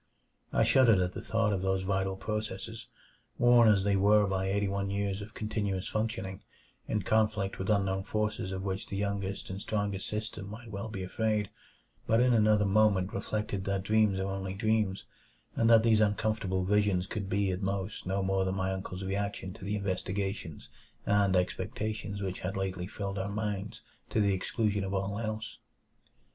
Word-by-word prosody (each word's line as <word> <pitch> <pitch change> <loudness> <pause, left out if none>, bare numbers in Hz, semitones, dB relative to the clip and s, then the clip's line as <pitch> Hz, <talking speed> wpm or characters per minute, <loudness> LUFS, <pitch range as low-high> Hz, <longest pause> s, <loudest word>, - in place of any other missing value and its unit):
I - - +3
shuddered 120 -6 +6
at 90 0 0
the - - -5
thought 110 -2 +1
of 95 - -1
those 95 0 0
vital 95 0 0
processes, 105 +2 -4 0.5
worn 120 -1 +6
as 100 -3 +5
they 100 0 +2
were 105 +2 +5
by 95 -1 -1
eighty 100 +1 +1
one 100 0 -1
years 100 0 -1
of 105 +2 -9
continuous 100 -3 -2
functioning, 100 -4 -3 0.5
in 105 -3 -1
conflict 110 -2 +1
with 95 - -3
unknown 95 -2 +2
forces 105 -2 -2
of 95 0 -4
which 95 0 -3
the 100 - -5
youngest 100 -1 -2
and 95 +1 -5
strongest 100 -2 -2
system 105 -2 -4
might 110 +2 -9
well 100 +2 -4
be 100 -4 -5
afraid; 105 +2 0 0.6
but 115 - +4
in 125 0 +4
another 105 -2 +4
moment 100 -1 +3
reflected 105 -2 -2
that 95 -1 -1
dreams 105 -1 +3
are 95 - -1
only 95 -1 -4
dreams, 110 -2 0 0.5
and 115 - +3
that 115 -1 +7
these 115 -2 +4
uncomfortable 105 -3 +1
visions 100 -2 +2
could 100 0 -4
be, 100 -1 +1
at 90 +2 -3
most, 95 0 -3
no 95 +1 0
more 95 0 +1
than 95 0 -1
my 95 0 0
uncle's 95 0 -5
reaction 100 -1 -3
to - - -13
the 100 +2 -1
investigations 95 -3 -3 0.4
and 100 -2 +3
expectations 100 +2 -2
which 95 -1 -3
had 95 +1 -3
lately 95 -2 -2
filled 100 -1 -4
our 95 +1 -2
minds 105 -1 -3 0.3
to - - 0
the 100 -2 +3
exclusion 105 +2 0
of 95 +1 -2
all 100 +2 -1
else. 110 -1 -4
100 Hz, 180 wpm, -30 LUFS, 95-105 Hz, 0.6 s, that